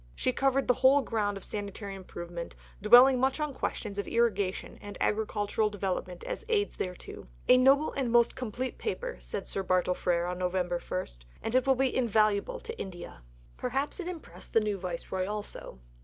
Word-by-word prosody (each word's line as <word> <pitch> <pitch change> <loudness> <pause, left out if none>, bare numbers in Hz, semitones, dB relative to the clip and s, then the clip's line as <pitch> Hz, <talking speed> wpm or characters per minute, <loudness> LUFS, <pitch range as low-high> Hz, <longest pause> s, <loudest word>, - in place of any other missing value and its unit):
She 255 - +1
covered 270 0 +1
the 250 - +5
whole 265 +3 +5
ground 210 -5 -1
of 195 - -9
sanitary 200 -1 -5
improvement, 175 -3 -7 0.3
dwelling 245 +5 +8
much 265 +3 +1
on 300 -2 -1
questions 205 -5 -3
of 200 - -3
irrigation 205 -5 0
and 205 0 -8
agricultural 210 0 0
development 185 -3 -3
as - - -5
aids 415 -3 +1
thereto. 180 - -6 0.2
"A 250 - +8
noble 270 +4 +5
and 270 -3 -1
a - - -1
most 235 0 +4
complete 250 +1 -4
Paper," - - -3
said 195 - -5
Sir 195 - -3
Bartle 185 -1 +2
Frere 175 0 0
(Nov. 180 0 -2
1), 180 -1 0 0.7
"and 225 - -2
it 255 +1 +3
will 265 - +5
be 265 0 +1
invaluable 215 - +2
to 460 0 -7
India." 180 - -7 0.4
Perhaps 270 - -2
it 365 - -4
impressed 355 -3 -9
the - - +6
new 210 -2 -1
Viceroy 185 +1 -3
also. 210 - -5
215 Hz, 175 wpm, -30 LUFS, 190-260 Hz, 0.7 s, dwelling